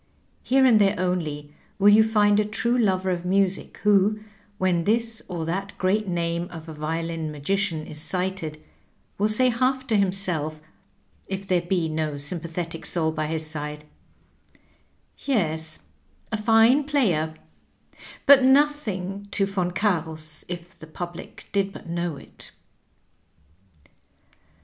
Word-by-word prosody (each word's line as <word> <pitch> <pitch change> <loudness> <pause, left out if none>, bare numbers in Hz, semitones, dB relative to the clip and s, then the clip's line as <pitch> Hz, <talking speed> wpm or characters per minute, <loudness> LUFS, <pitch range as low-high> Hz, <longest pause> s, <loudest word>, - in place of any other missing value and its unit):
Here 265 +1 +3
and 225 -5 +6
there 200 0 +3
only 155 -5 -2 0.2
will 205 0 +6
you 215 +1 +7
find 210 -2 +3
a - - +3
true 235 +3 -1
lover 190 -5 +1
of 175 -1 -2
music 195 +1 0
who, 210 +1 +4 0.4
when 175 -3 +1
this 225 +1 0
or 170 -3 -4
that 195 +4 -4
great 200 +3 +1
name 170 -1 -1
of 165 -2 -10
a 160 - -7
violin 160 +1 -3
magician 160 +2 -1
is 150 - -5
cited, 180 -3 -3 0.6
will 210 +1 +3
say 255 +4 +6
half 260 +2 0
to 225 - 0
himself 185 -6 0 0.7
if 195 0 -4
there 185 -2 +2
be 175 -1 0
no 155 -2 -2
sympathetic 165 +2 -4
soul 160 -2 0
by 155 -1 -2
his 160 0 -1
side, 150 -1 -4 1.3
"Yes, 160 - -1 0.5
a 220 - 0
fine 225 +6 +5
player; 180 - +1 0.9
but 280 -2 +8
nothing 230 -9 +1
to 200 -1 +2
Yon 190 -3 -1
Cams, 160 -5 -2
if 175 0 -8
the 160 - -11
public 175 +2 -8
did 195 -1 0
but - - -11
know 170 -2 -3
it." - - -11
185 Hz, 135 wpm, -24 LUFS, 160-210 Hz, 1.3 s, but